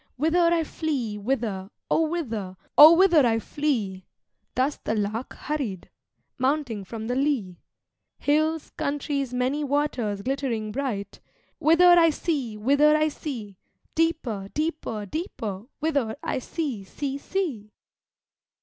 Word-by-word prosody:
Whither 335 Hz, +5 st, +3 dB
I 335 Hz, -1 st, +2 dB
flee, 270 Hz, -10 st, -3 dB
whither, 205 Hz, -4 st, -2 dB, 0.2 s
O 320 Hz, -, +3 dB
whither, 225 Hz, -, -4 dB, 0.2 s
O 305 Hz, +3 st, +11 dB
whither 345 Hz, -4 st, +5 dB
I 230 Hz, -2 st, +3 dB
flee!' 220 Hz, -8 st, -2 dB, 0.5 s
(Thus 270 Hz, +3 st, +1 dB
the 220 Hz, -, -2 dB
Lark 215 Hz, +4 st, -2 dB
hurried, 260 Hz, -, -4 dB, 0.5 s
mounting 260 Hz, -6 st, 0 dB
from 220 Hz, +3 st, -7 dB
the 245 Hz, -, -1 dB
lea) 255 Hz, -, 0 dB, 0.6 s
'Hills, 310 Hz, +2 st, +1 dB
countries, 280 Hz, -2 st, -2 dB
many 255 Hz, +4 st, 0 dB
waters 260 Hz, -8 st, -1 dB
glittering 250 Hz, -5 st, -2 dB
bright, 215 Hz, -6 st, -3 dB, 0.4 s
Whither 330 Hz, +3 st, +5 dB
I 350 Hz, -2 st, +7 dB
see, 280 Hz, -9 st, -2 dB
whither 285 Hz, +7 st, +4 dB
I 310 Hz, 0 st, +2 dB
see! 225 Hz, -, -7 dB, 0.3 s
deeper, 295 Hz, -12 st, 0 dB
deeper, 305 Hz, -9 st, -2 dB
deeper, 215 Hz, -, -5 dB
whither 285 Hz, -7 st, 0 dB
I -, -, -1 dB
see, 260 Hz, -, -4 dB
see, 275 Hz, +7 st, -4 dB
see!' 280 Hz, -, -3 dB
270 Hz, 120 wpm, -25 LUFS, 215-305 Hz, 0.6 s, O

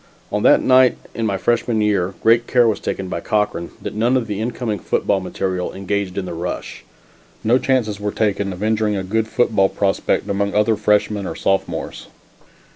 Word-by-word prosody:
On -, -, 0 dB
that -, -, +5 dB
night 130 Hz, -1 st, +5 dB, 0.2 s
in 115 Hz, -1 st, -2 dB
my 100 Hz, -2 st, -1 dB
freshman 120 Hz, +2 st, 0 dB
year, 100 Hz, -3 st, +1 dB
great 115 Hz, +1 st, +4 dB
care 120 Hz, -2 st, +4 dB
was 110 Hz, -, 0 dB
taken 95 Hz, -, -3 dB
by 85 Hz, -, -3 dB
Cochran 105 Hz, -2 st, -1 dB
that -, -, -6 dB
none 120 Hz, +4 st, +2 dB
of 125 Hz, -, -1 dB
the 105 Hz, -1 st, -4 dB
incoming 115 Hz, -2 st, -3 dB
football 100 Hz, -, 0 dB
material 95 Hz, -1 st, -3 dB
engaged 100 Hz, 0 st, -3 dB
in 95 Hz, -, -2 dB
the 90 Hz, -, -5 dB
rush. 85 Hz, +2 st, -5 dB, 0.6 s
No 120 Hz, +4 st, +3 dB
chances 115 Hz, -7 st, 0 dB
were 105 Hz, 0 st, -2 dB
taken 100 Hz, -2 st, 0 dB
of 90 Hz, +2 st, -6 dB
injuring 110 Hz, -1 st, +1 dB
a 95 Hz, -, -3 dB
good 110 Hz, +4 st, -1 dB
football 105 Hz, -4 st, +2 dB
prospect 100 Hz, -1 st, 0 dB
among 100 Hz, 0 st, -1 dB
either 105 Hz, +1 st, +3 dB
freshmen 105 Hz, -1 st, +1 dB
or -, -, -5 dB
sophomores. 95 Hz, 0 st, -2 dB
105 Hz, 185 wpm, -20 LUFS, 95-110 Hz, 0.6 s, that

